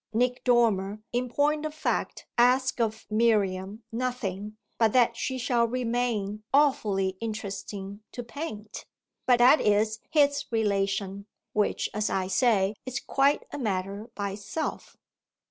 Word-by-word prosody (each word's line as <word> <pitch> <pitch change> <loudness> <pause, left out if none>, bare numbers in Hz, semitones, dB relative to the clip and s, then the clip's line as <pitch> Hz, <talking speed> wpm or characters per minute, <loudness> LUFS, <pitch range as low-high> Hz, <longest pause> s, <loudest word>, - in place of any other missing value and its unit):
Nick 245 +2 +1
Dormer 215 -5 +2
in 245 +1 0
point 295 +4 +1
of 310 0 -4
fact - - -2
asks 255 +2 +3
of 220 -1 -1
Miriam 210 -2 +1
nothing 215 -4 -3 0.2
but 225 -2 +3
that 240 -2 +4
she 260 +2 -2
shall 240 -1 +2
remain 230 -4 -1
"awfully 210 -10 +2
interesting 205 -2 -5
to 245 - -6
paint"; 230 -5 -7 0.4
but 250 -1 +6
that 250 +5 +6
is 215 +1 +2
his 285 -2 +3
relation, 200 -2 -1 0.3
which, 210 -1 +1
as 210 0 0
I 190 - 0
say, 200 0 +2
is 255 +1 -3
quite 275 +2 +2
a 290 - -5
matter 200 -1 -3
by 200 -1 -2
itself. 205 +11 -5
225 Hz, 130 wpm, -27 LUFS, 200-250 Hz, 0.4 s, but